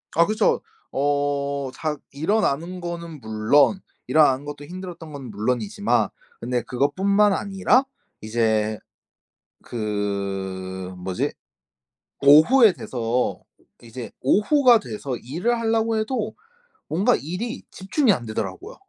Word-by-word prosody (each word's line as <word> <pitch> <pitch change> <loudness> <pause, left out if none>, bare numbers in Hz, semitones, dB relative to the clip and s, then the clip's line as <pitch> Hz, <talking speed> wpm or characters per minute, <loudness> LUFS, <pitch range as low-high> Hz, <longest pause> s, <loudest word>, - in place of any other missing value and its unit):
아 170 +1 +5
그쵸. 215 +1 +2 0.3
어 140 -1 0
자 155 -1 -2 0.2
일어나는 170 +1 0
거는 170 -4 -6
물론 110 - +3 0.3
일어나는 145 -3 +4
것도 145 0 -7
힘들었던 175 -3 -8
거는 135 -4 -8
물론이지만 125 - 0 0.3
근데 125 -2 -2
그것뿐만 195 - +2
아니라 200 +7 +2 0.4
이제 110 -1 0 0.8
그 95 -4 -3
뭐지? 90 0 -2 0.9
오후에 175 - +7
돼서 120 0 -2 0.4
이제 120 +1 -8
오후가 240 - +5
돼서 125 - -5
일을 180 - -1
하려고 225 0 +1
해도 220 -1 -2 0.5
뭔가 200 +10 +2
일이 205 - -4
집중이 235 - +1
안 120 -10 -1
되더라고요. 380 - -5
145 Hz, 240 characters per minute, -23 LUFS, -, 0.9 s, 오후에